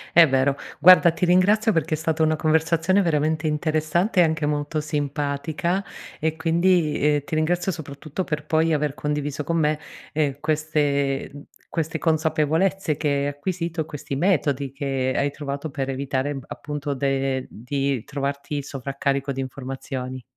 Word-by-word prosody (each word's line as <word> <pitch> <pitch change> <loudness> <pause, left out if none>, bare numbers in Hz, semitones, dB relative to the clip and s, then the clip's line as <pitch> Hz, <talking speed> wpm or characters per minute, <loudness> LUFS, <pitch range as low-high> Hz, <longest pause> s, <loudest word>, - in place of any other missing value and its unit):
È 165 -2 +8
vero. 135 +1 +2 0.2
Guarda 180 +2 +8
ti 175 - -1
ringrazio 205 +5 +4
perché 160 -2 0
è - - -6
stata 160 0 -1
una 155 0 +3
conversazione 165 +4 +2
veramente 155 -2 +1
interessante 155 +5 +1
e - - +8
anche 160 -2 0
molto 150 +1 -1
simpatica, 150 +4 -2 0.4
e 160 0 0
quindi, 165 -3 +2
uhm, - - -14
ti 160 - -10
ringrazio 175 +4 +1
soprattutto 155 +2 -5
per 150 -2 -3
poi 160 +1 +2
aver 150 -1 0
condiviso 150 0 -2
con 165 +3 -1
me, 150 -1 +1 0.3
ehm, 145 -3 0
queste 145 -3 0 0.4
queste 160 -1 -1
consapevolezze 160 +2 +1
che 155 - -1
hai 140 0 +1
acquisito, 165 +3 -2
questi 140 -1 -5
metodi 145 -5 +1
che 135 -2 -1
hai 140 0 +1
trovato 145 +1 -5
per 135 -1 -3
evitare 135 +1 -2
appunto 145 -1 -4
de 135 -1 -1
di 135 +1 -2
trovarti 140 +1 -3
sovraccarico 140 0 -2
di 135 - -3
informazioni. 130 -1 -5
150 Hz, 145 wpm, -23 LUFS, 140-160 Hz, 0.4 s, È